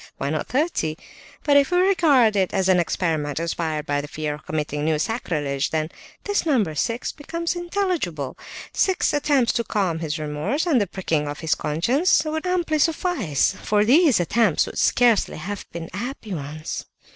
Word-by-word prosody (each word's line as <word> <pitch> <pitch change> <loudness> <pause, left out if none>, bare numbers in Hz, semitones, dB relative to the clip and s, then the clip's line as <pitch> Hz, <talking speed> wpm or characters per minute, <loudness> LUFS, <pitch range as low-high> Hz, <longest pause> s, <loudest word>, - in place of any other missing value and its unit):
Why 140 - -2
not 155 - -2
thirty? 250 - 0 0.5
But 285 -1 +5
if 280 -1 +4
we 355 - +2
regard 315 - +4
it 190 -2 +1
as 190 -1 +1
an 185 -1 +4
experiment, 160 -4 -1
inspired 160 -2 -2
by 145 -1 0
the 145 - -8
fear 150 0 -3
of 150 - -12
committing 150 -1 -2
new 155 0 +1
sacrilege, 150 - -1
then 155 0 -2 0.3
this 410 0 0
number 235 - +1
six 230 - -1
becomes 335 +3 -4
intelligible. 345 - -2 0.4
Six 380 -4 +1
attempts 285 -4 +2
to 235 - 0
calm 190 -8 -1
his 160 -1 -3
remorse, 155 - -2
and 290 -10 +3
the 200 - 0
pricking 165 -5 -1
of 145 +2 -6
his 160 -2 +1
conscience, 255 - +2
would 315 +3 -2
amply 345 -4 0
suffice, 295 - +1
for 210 0 +2
these 285 - +5
attempts 195 +1 +2
could - - -6
scarcely 240 -4 +3
have 195 +6 -6
been 165 -1 -6
happy 225 0 -5
ones. 155 0 -5
200 Hz, 170 wpm, -23 LUFS, -, 0.5 s, But